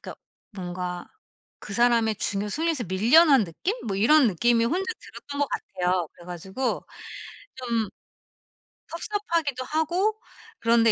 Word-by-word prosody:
그니까 - - -8 0.4
뭔가 180 -2 -5 0.6
그 200 - -7
사람의 230 -2 +3
중요 200 +1 0
순위에서 315 -1 0
밀려난 240 - +5
느낌? 190 - -3
뭐 195 -3 -2
이런 250 +5 +5
느낌이 230 +5 +2
혼자 375 - -1
들었던 285 0 -8
것 285 - +1
같아요. 180 -2 -1
그래 175 - -16
가지고 190 +9 -3 0.7
좀 235 -4 -1 1.0
섭섭하기도 335 -8 -2
하고 350 +9 0 0.4
그런데 230 -1 +4
235 Hz, 280 characters per minute, -25 LUFS, 195-310 Hz, 1.0 s, 밀려난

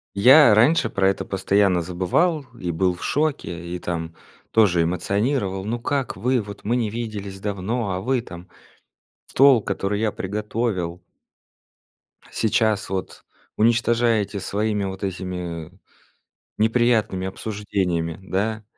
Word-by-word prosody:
Я 125 +3 +7
раньше 125 +2 +4
про 95 -2 +1
это 95 - 0
постоянно 95 -1 +2
забывал 95 - 0 0.2
и 90 - -2
был 90 +2 +1
в 90 - -10
шоке, 140 - -2
и - - -2
там 85 -2 -5 0.4
тоже 100 -6 +4
эмоционировал: 95 - -1
ну, 115 +3 -2
как 135 -4 -2
вы, 125 +5 +1
вот 100 -1 -10
мы 115 +4 0
не 115 -3 0
виделись 105 -4 -5
давно, 100 +2 -2
а 90 0 -2
вы 125 +3 0
там 90 -5 -11 0.8
стол, 135 -3 +5
который 100 +1 -2
я 110 -1 +1
приготовил 100 -3 -3 1.3
сейчас 110 -2 +1
вот 95 -1 -5 0.3
уничтожаете 115 -2 +2
своими 105 +1 -1
вот 95 +1 -6
этими 90 -3 -5 0.9
неприятными 110 -4 +2
обсуждениями, 95 -5 -2
да. 105 +3 -2
100 Hz, 120 wpm, -23 LUFS, 95-115 Hz, 1.3 s, Я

